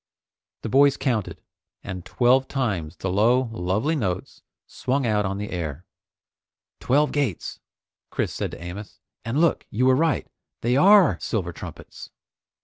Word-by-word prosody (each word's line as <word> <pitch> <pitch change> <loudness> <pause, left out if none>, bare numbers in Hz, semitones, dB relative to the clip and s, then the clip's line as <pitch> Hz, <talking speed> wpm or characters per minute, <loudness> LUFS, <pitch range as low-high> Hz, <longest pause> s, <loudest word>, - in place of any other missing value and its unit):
The - - -3
boys 140 +3 +5
counted, 120 -7 -1 0.4
and 90 -2 -6
twelve 130 +5 +2
times 95 - -2
the 95 - -3
low, 115 +5 +3
lovely 110 - 0
notes 95 - -3 0.2
swung 135 +1 -2
out 105 -3 +1
on 95 +1 -3
the 105 +1 -5
air. 85 -2 -4 0.9
"Twelve 145 +4 +2
gates!" 135 - -2 0.5
Chris - - -2
said - - -3
to - - -9
Amos, 95 +4 -8 0.3
"And 115 +6 -1
look, 170 0 +2
you 125 +5 0
were 130 0 +5
right, 155 -2 +1 0.4
they 120 +2 +1
are 195 +3 +6
silver 90 -7 -2
trumpets!" - - -10
115 Hz, 140 wpm, -24 LUFS, 95-135 Hz, 0.9 s, are